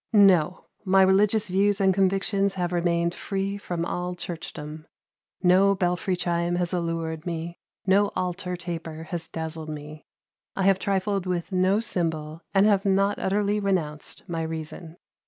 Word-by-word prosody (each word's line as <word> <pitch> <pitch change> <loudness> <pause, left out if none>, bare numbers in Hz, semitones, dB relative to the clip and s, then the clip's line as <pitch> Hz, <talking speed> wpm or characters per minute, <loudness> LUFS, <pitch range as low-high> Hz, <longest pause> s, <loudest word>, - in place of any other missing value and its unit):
No! 185 -5 +5 0.2
My 190 -1 +5
religious 205 +3 +3
views 195 +2 +2
and 190 -1 +4
convictions 195 +1 +1
have 180 -2 -1
remained 170 -1 +1
free 195 +1 -3
from 175 -4 -3
all 180 +1 -3
churchdom; 155 -3 -7 0.6
no 190 +2 +5
belfry 180 0 0
chime 175 0 0
has 175 0 -1
allured 165 -2 -2
me, 170 0 -4 0.3
no 200 +2 +4
altar 180 0 -2
taper 165 -2 -6
has 170 -2 -3
dazzled 160 -1 -5
me. 150 0 -8 0.5
I 195 - 0
have 195 0 +4
trifled 195 -1 -1
with 180 +1 -2
no 185 +2 +3
symbol, 165 -7 -2
and 195 0 +4
have 200 -2 +4
not 195 +1 +2
utterly 205 +2 +1
renounced 170 -7 -2
my 165 -2 -3
reason. 160 +1 -6
180 Hz, 145 wpm, -26 LUFS, 165-195 Hz, 0.6 s, No